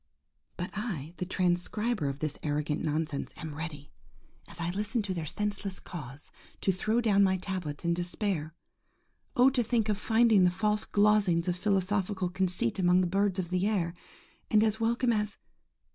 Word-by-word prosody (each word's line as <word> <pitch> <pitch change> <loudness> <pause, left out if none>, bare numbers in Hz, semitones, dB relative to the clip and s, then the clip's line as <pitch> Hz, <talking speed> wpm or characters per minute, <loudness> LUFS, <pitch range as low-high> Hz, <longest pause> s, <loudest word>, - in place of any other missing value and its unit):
–But 180 0 -4
I–the 180 - -4
transcriber 185 +1 0
of 135 - -4
this 155 -2 -3
arrogant 150 0 -1
nonsense–am 155 0 -3
ready, 150 -2 -7 0.6
as 170 - -13
I 170 +1 -1
listen 210 +4 -1
to 195 -2 -2
their 165 -3 -4
senseless 200 0 -2
caws, 145 -5 -6 0.3
to 195 - +3
throw 215 +6 0
down 200 -3 +4
my 190 -1 +3
tablets 180 -5 -5
in 170 - +3
despair. 175 -2 -2 0.8
Oh! 255 +2 +6
to 255 -2 +2
think 230 -2 +1
of 210 -1 0
finding 225 -3 +4
the 180 - +6
false 210 +4 0
glozings 205 -5 +3
of 180 - +1
philosophical 190 0 0
conceit 180 -7 0
among 180 0 +4
the - - +2
birds 195 +2 +1
of 180 -2 -3
the 185 +2 +1
air, 180 -6 0 0.6
and 215 0 +5
as 220 0 +2
welcome 235 +2 +2
as 210 -1 -1
185 Hz, 160 wpm, -30 LUFS, 170-210 Hz, 0.8 s, Oh